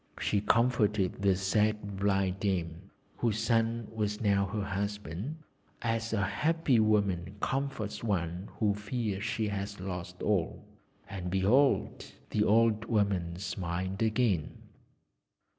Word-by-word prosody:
She 100 - +1
comforted 105 -5 +2
the 100 -2 +4
sad 105 +1 0
blind 95 -1 +1
dame, 95 -2 -2 0.3
whose 115 -3 0
son 115 0 +1
was 105 -1 -1
now 100 -2 +2
her 105 +2 -2
husband, 100 - -3 0.5
as 115 -1 -1
a 105 -2 +1
happy 145 - +2
woman 100 -4 +1
comforts 135 -5 -2
one 90 -3 -2
who 105 -2 +2
fears 105 -1 -3
she 110 -1 -1
has 100 0 -4
lost 90 -1 -6
all, 95 -6 0 0.4
and 95 -2 -5
behold! 105 +10 +2 0.2
the 105 - +2
old 110 0 +3
woman 100 -7 0
smiled 95 +1 -3
again. 110 -7 +1
100 Hz, 120 wpm, -30 LUFS, 95-110 Hz, 0.5 s, the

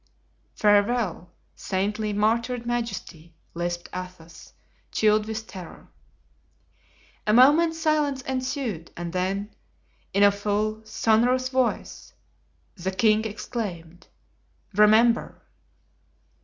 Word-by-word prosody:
"Farewell, 205 -3 +2 0.3
saintly, 210 +3 -2
martyred 230 +4 0
majesty," 230 -9 -4 0.2
lisped 175 0 -3
Athos, 180 -3 -9 0.4
chilled 215 0 +2
with 220 0 -4
terror. 185 -5 -11 1.4
A 210 - +3
moment's 305 +7 +5
silence 300 -4 0
ensued 255 - -3
and 170 0 -5
then, 195 +3 -2 0.6
in 200 - +3
a 200 - +7
full, 210 +2 -2
sonorous 245 +4 +2
voice, 260 -2 -2 0.6
the 185 -1 -3
king 215 +3 +2
exclaimed: 190 -6 -6 0.7
"Remember!" 220 +3 +3
215 Hz, 90 wpm, -25 LUFS, 185-240 Hz, 1.4 s, a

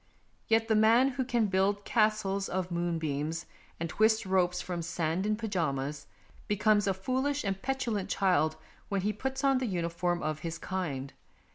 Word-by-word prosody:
Yet 225 0 +3
the 225 - +3
man 225 +5 +5
who 265 0 -2
can 240 -3 +1
build 200 +1 +1
castles 215 -3 +1
of 185 -1 -2
moonbeams 165 -2 -2 0.3
and 170 - -2
twist 220 +5 +2
ropes 185 -2 +2
from 175 -2 -4
sand 170 +2 -1
in 215 - +2
pyjamas, 150 -10 -2 0.4
be 210 - 0
comes 210 -1 +3
a 195 - +3
foolish 260 +8 -1
and 195 -2 -2
petulant 245 -7 -2
child 180 -5 +2 0.3
when 200 -1 0
he 210 +3 0
puts 265 +5 -3
on 270 -1 +4
the 255 - -1
uniform 175 -1 -1
of 155 -1 -2
his 165 +1 -4
kind. 150 -9 -4
195 Hz, 165 wpm, -30 LUFS, 170-220 Hz, 0.4 s, man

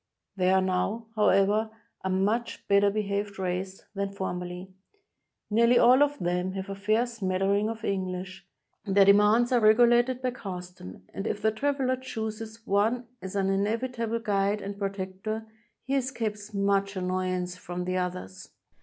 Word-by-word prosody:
They 185 -1 +2
are 190 0 +4
now, 190 +5 -1
however, 210 +1 +3 0.3
a 190 - -1
much 205 +6 -1
better 200 0 +5
behaved 200 -1 -2
race 190 +1 -3
than 200 -1 -2
formerly. 180 -1 -5 0.8
Nearly 235 +3 +5
all 255 +3 +6
of 290 0 +3
them 180 +1 -1
have 190 +1 -5
a 195 - -4
fair 215 +4 +1
smattering 200 -2 0
of 225 0 -5
English, 185 -1 -4 0.4
their 200 -1 +4
demands 210 +5 +5
are 245 - +4
regulated 240 +3 +4
by 255 - +1
custom, 180 - -8
and 195 - -4
if - - -2
the 220 +1 +2
traveler 260 +2 0
chooses 220 -2 -6
one 220 +5 +1 0.2
as 190 +1 -7
an 195 -1 +1
inevitable 230 +3 -1
guide 205 -2 0
and 200 0 -6
protector, 195 +2 -4 0.4
he 270 - -2
escapes 225 -6 -2
much 200 0 +1
annoyance 185 -1 -2
from 180 0 -5
the 185 0 -1
others. 180 - -5
200 Hz, 145 wpm, -28 LUFS, 190-225 Hz, 0.8 s, all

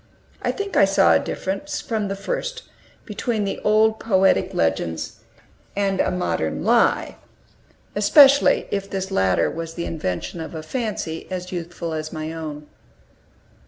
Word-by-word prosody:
I - - 0
think 405 -1 -5
I 195 - +6
saw 195 0 +4
a - - +5
difference, 290 +11 -4
from 215 -3 -2
the 195 - -3
first, - - -4 0.4
between 215 +1 -2
the 200 - -3
old 220 +1 +3
poetic 195 -3 +2
legends 80 0 -1 0.6
and 195 -1 0
a - - +2
modern 80 - -2
lie, - - +2 0.8
especially 275 +7 +6
if 200 0 -2
this 190 0 -4
latter 95 - +2
was 165 0 -5
the 170 - -3
invention 155 - -4
of 160 - -7
a 155 - -5
fancy 200 -5 -4
as 180 -1 -5
youthful 170 -1 -5
as 155 0 -4
my 155 0 -5
own. 150 -2 -6
190 Hz, 145 wpm, -22 LUFS, 160-215 Hz, 0.8 s, I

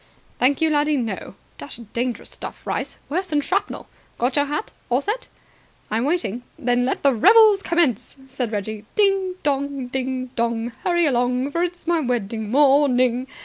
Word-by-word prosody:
"Thank 265 +4 +3
you, 320 -1 +3
laddie, 295 0 +2
no. 220 -6 -4 0.2
Dashed 210 +10 -9
dangerous 240 0 -2
stuff, - - -8
rice! - - -3
Worse 365 +6 -2
than 300 -3 +1
shrapnel. 380 +7 -2 0.3
Got 245 +2 0
your 285 -1 +3
hat? 295 +8 -3 0.2
All 245 +1 +3
set?" 430 - -3 0.6
"I'm 225 +3 +1
waiting." 285 - -1 0.2
"Then 245 -4 +1
let 260 - -2
the 280 -1 +5
revels 420 - +6
commence," 285 - 0
said 255 -4 -3
Reggie. 210 0 -4
"Ding 390 -3 +2
dong! 280 -3 -1
Ding 255 -1 -3
Dong! 235 0 -1
Hurry 345 -1 +2
along! 250 0 +1
For 335 - -1
it 355 0 0
is 350 - -19
my 340 -1 +2
wedding 230 -5 -2
morning! 260 -2 +3
265 Hz, 165 wpm, -22 LUFS, 245-320 Hz, 0.6 s, revels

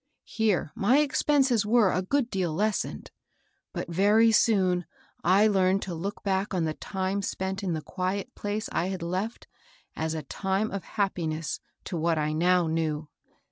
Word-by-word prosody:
Here 210 -9 0
my 240 +8 +3
expenses 275 -5 +3
were 215 -2 +4
a 185 - 0
good 250 +5 0
deal 185 -4 0
lessened; 210 +5 -2 0.6
but - - -4
very 205 +6 +4
soon 185 -6 +3 0.4
I 190 +4 +5
learned 195 -2 +3
to 185 - -5
look 185 +5 -5
back 195 0 0
to 185 - -1
the 160 -1 0
time 190 +3 -3
spent 190 +1 -3
in 185 -4 -1
the 155 -1 -3
quiet 190 +5 -3
place 205 +1 -3
50 - - -8
MABEL - - +1
BOSS. - - -1
I - - -3
had 180 -3 -5
left 185 +7 -3 0.5
as 160 0 -2
a 155 - -4
time 195 +8 -1
of 195 -2 -4
happiness 165 -7 -2 0.2
to 175 - -4
what 165 0 +1
I 155 0 0
now 175 +2 +3
knew. 160 -2 -2
190 Hz, 180 wpm, -27 LUFS, 170-210 Hz, 0.6 s, I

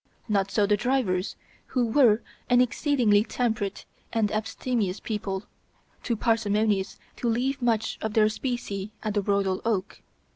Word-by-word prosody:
Not 200 -3 +1
so 205 +1 +2
the 210 +1 +3
drivers, 215 -5 0 0.3
who 250 -2 +1
were 230 -2 +4 0.3
an 245 - +5
exceedingly 250 -5 +3
temperate 220 -3 -2 0.3
and 220 -3 +1
abstemious 215 -2 -1
people, 200 -3 -3 0.6
too 235 - -1
parsimonious 215 -3 +1 0.2
to 240 - -1
leave 260 +4 0
much 225 -2 0
of 220 -1 -3
their 215 -1 +5
specie 215 -3 -3
at 215 -2 -1
the 205 - +1
Royal 195 -1 0
Oak. 205 -4 -2
215 Hz, 140 wpm, -26 LUFS, 200-240 Hz, 0.6 s, an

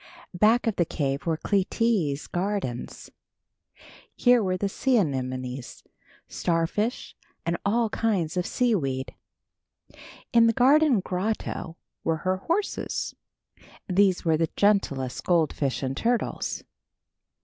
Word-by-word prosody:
Back 220 +7 +3
of 225 -3 0
the 175 - +4
cave 140 -2 -2
were 160 -1 +1
Clytie's 195 -6 0
gardens. 180 -9 -4 1.0
Here 245 -1 +4
were 185 -2 0
the 200 - -1
sea 250 +5 +1
anemones, 130 - -3 0.4
starfish 175 +8 -1 0.3
and 170 - 0
all 225 +3 +2
kinds 195 -10 0
of 180 -1 -1
seaweed. 145 - 0 1.2
In 230 -1 +6
the 230 - +3
garden 270 -1 +4
grotto 180 -3 -3 0.3
were 165 -1 +1
her 185 0 +1
horses. 340 - -2 0.7
These 190 -1 +2
were 160 -1 +3
the 165 0 0
gentlest 140 -11 +1
goldfish 155 -6 +1
and 135 0 -2
turtles. 235 - -1
185 Hz, 110 wpm, -26 LUFS, 155-225 Hz, 1.2 s, In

